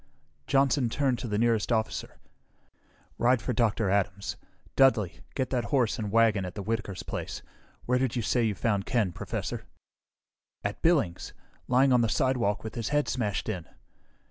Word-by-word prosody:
Johnson 135 Hz, -2 st, +3 dB
turned 130 Hz, 0 st, 0 dB
to 125 Hz, -, -4 dB
the 105 Hz, -2 st, -1 dB
nearest 115 Hz, 0 st, +2 dB
officer. 110 Hz, -1 st, -1 dB, 1.0 s
"Ride 125 Hz, +1 st, +4 dB
for 125 Hz, -, -2 dB
Dr. 110 Hz, -2 st, +1 dB
Adams. 100 Hz, 0 st, -1 dB, 0.4 s
Dudly, 115 Hz, -9 st, +3 dB, 0.2 s
get 130 Hz, -2 st, -1 dB
that 125 Hz, -3 st, 0 dB
horse 125 Hz, -6 st, +1 dB
and 105 Hz, -2 st, -3 dB
wagon 110 Hz, -2 st, +4 dB
that's 90 Hz, +1 st, -6 dB
at 100 Hz, -, -5 dB
Whitaker's 110 Hz, -3 st, -3 dB
place. -, -, -5 dB, 0.4 s
Where 125 Hz, +1 st, +2 dB
did 130 Hz, -2 st, 0 dB
you 120 Hz, -, -1 dB
say 120 Hz, +2 st, +1 dB
you 110 Hz, -3 st, 0 dB
found 100 Hz, -1 st, 0 dB
Ken, 110 Hz, -7 st, +1 dB
Professor?" -, -, -4 dB, 1.0 s
"At 100 Hz, 0 st, -3 dB
Billings. 150 Hz, -, +1 dB, 0.3 s
Lying 130 Hz, +1 st, +4 dB
on 125 Hz, -, +5 dB
the 115 Hz, -, +1 dB
sidewalk 120 Hz, -6 st, +1 dB
with 110 Hz, -, -6 dB
his 115 Hz, -3 st, -3 dB
head 145 Hz, 0 st, +1 dB
smashed 105 Hz, -6 st, -1 dB
in." 90 Hz, -6 st, -4 dB
115 Hz, 165 wpm, -28 LUFS, 105-125 Hz, 1.0 s, on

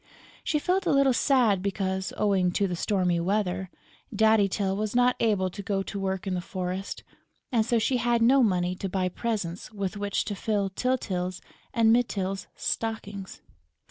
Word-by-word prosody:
She 305 Hz, -, +1 dB
felt 365 Hz, +5 st, 0 dB
a -, -, +3 dB
little 275 Hz, -2 st, +4 dB
sad 235 Hz, -7 st, +3 dB
because, 190 Hz, -1 st, -2 dB
owing 195 Hz, -4 st, +2 dB
to 200 Hz, -, +1 dB
the 180 Hz, -, -2 dB
stormy 180 Hz, -2 st, +1 dB
weather, 190 Hz, 0 st, -1 dB, 0.4 s
Daddy 220 Hz, -2 st, +4 dB
Tyl 195 Hz, 0 st, -1 dB
was 215 Hz, +2 st, -2 dB
not 245 Hz, 0 st, +4 dB
able 200 Hz, -5 st, +1 dB
to 200 Hz, -, -7 dB
go 195 Hz, -1 st, -1 dB
to 200 Hz, -, -5 dB
work 190 Hz, 0 st, -2 dB
in 190 Hz, -, -1 dB
the 180 Hz, -, -1 dB
forest; 185 Hz, +1 st, -4 dB, 0.5 s
and 230 Hz, -3 st, +3 dB
so 235 Hz, +2 st, +1 dB
she 250 Hz, +3 st, +1 dB
had 240 Hz, 0 st, +2 dB
no 265 Hz, +3 st, +5 dB
money 180 Hz, -5 st, +2 dB
to 195 Hz, -, -3 dB
buy 185 Hz, 0 st, 0 dB
presents 200 Hz, -4 st, -3 dB
with 200 Hz, -1 st, -4 dB
which 205 Hz, -1 st, -1 dB
to 205 Hz, -, -3 dB
fill 200 Hz, -1 st, -1 dB
Tyltyl 185 Hz, -6 st, -1 dB, 0.3 s
and 225 Hz, -1 st, +4 dB
Mytyl's 195 Hz, -5 st, 0 dB
stockings. 205 Hz, -4 st, -4 dB
200 Hz, 175 wpm, -27 LUFS, 190-225 Hz, 0.5 s, no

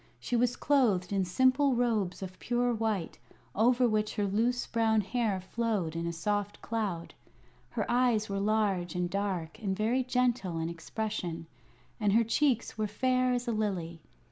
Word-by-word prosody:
She 245 Hz, -, -2 dB
was 245 Hz, +1 st, +2 dB
clothed 210 Hz, -10 st, +2 dB
in 195 Hz, -2 st, +1 dB
simple 260 Hz, +8 st, +3 dB
robes 215 Hz, -7 st, 0 dB
of 185 Hz, -1 st, -8 dB
pure 245 Hz, 0 st, +1 dB
white, 215 Hz, -6 st, -2 dB, 0.3 s
over 245 Hz, +3 st, +4 dB
which 215 Hz, -1 st, 0 dB
her 205 Hz, -, 0 dB
loose 230 Hz, +5 st, +1 dB
brown 220 Hz, -2 st, +2 dB
hair 210 Hz, -1 st, -1 dB
flowed 195 Hz, -4 st, -2 dB
in 165 Hz, 0 st, -2 dB
a -, -, -1 dB
soft 205 Hz, +4 st, -2 dB
cloud. 205 Hz, -7 st, -3 dB, 0.6 s
Her -, -, -2 dB
eyes 240 Hz, -3 st, +2 dB
were 195 Hz, 0 st, -2 dB
large 200 Hz, -4 st, 0 dB
and 180 Hz, 0 st, -1 dB
dark 195 Hz, -3 st, -2 dB
and 190 Hz, -3 st, -1 dB
very 235 Hz, +5 st, +1 dB
gentle 245 Hz, -8 st, 0 dB
in 165 Hz, 0 st, -2 dB
expression, 170 Hz, -1 st, -4 dB, 0.5 s
and 205 Hz, -3 st, +2 dB
her 230 Hz, +2 st, +5 dB
cheeks 235 Hz, -1 st, +1 dB
were 215 Hz, -, +1 dB
fair 255 Hz, +4 st, +1 dB
as 245 Hz, 0 st, -1 dB
a -, -, +1 dB
lily. 185 Hz, -7 st, -2 dB
215 Hz, 165 wpm, -30 LUFS, 185-240 Hz, 0.6 s, her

